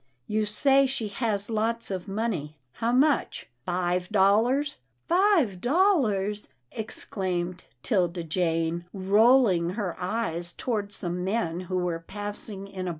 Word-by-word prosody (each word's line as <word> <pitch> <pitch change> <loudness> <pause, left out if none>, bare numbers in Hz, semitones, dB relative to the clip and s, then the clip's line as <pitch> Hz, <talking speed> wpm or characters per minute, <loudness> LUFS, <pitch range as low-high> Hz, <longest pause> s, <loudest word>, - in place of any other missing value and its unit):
" 120 - -47
You 215 -1 +1
say 270 +5 +4
she 255 -5 -3
has 205 -1 -1
lots 230 0 0
of 185 0 -4
money 195 -8 -3
— 125 - -47
how 230 +1 +1
much 265 - +1
— 120 - -47
five 180 0 0
dollars? 220 +9 +3
" 115 - -46
" - - -47
Five 345 - +3
dollars! 240 - +2
" 120 - -48
exclaimed 185 -5 -3 0.2
'Tilda 175 -5 0
Jane, 165 0 -1
rolling 200 -2 +4
her 200 -6 -2
eyes 180 -3 -2
toward 210 -5 -2
some 180 -2 -2
men 185 -4 -1
who 185 - 0
were 175 -2 -1
passing 205 +2 -5
in 185 -2 -5
a - - 0
200 Hz, 150 wpm, -27 LUFS, 175-230 Hz, 0.2 s, say